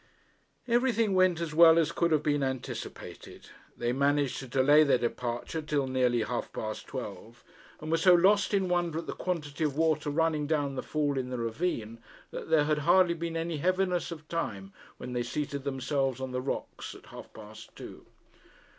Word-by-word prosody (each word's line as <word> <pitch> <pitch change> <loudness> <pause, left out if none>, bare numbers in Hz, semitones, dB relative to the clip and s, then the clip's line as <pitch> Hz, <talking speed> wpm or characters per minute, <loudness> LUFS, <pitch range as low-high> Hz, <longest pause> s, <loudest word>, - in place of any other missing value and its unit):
Everything 235 -3 +2
went 185 -2 +3
as 165 -3 -4
well 165 0 +7
as 165 -1 +2
could 170 0 +1
have 155 -1 +2
been 145 -1 +1
anticipated. 130 -2 -6 0.3
They 120 +1 -1
managed 140 0 +1
to 135 - -8
delay 140 +4 +5
their 140 -4 +3
departure 120 +5 -3
till 150 -2 -1
nearly 125 -3 +1
half 120 +3 -4
past 110 -1 -5
twelve, - - -8 0.4
and 155 +1 -6
were 165 - +3
so 180 +2 +6
lost 195 +3 +4
in 195 -2 +1
wonder 175 -2 0
at 165 - -4
the - - -4
quantity 160 -4 -3
of 145 -2 -1
water 160 -2 +1
running 155 -1 0
down 145 -3 0
the 135 - -3
fall 145 -3 -1
in 125 -1 -4
the 125 - -4
ravine, 115 -2 -3 0.3
that - - -7
there 160 -2 +4
had 150 0 +1
hardly 175 +3 +4
been 165 0 -4
any 165 -1 -2
heaviness 185 +2 0
of 160 -3 -9
time 100 -13 -4 0.2
when 125 - -7
they 120 - -1
seated 140 +2 -4
themselves 135 -1 -1
on 130 -1 -4
the 125 0 -2
rocks 135 - -5
at - - -15
half - - -10
past 110 0 -12
two. - - -11
150 Hz, 185 wpm, -29 LUFS, 130-170 Hz, 0.4 s, well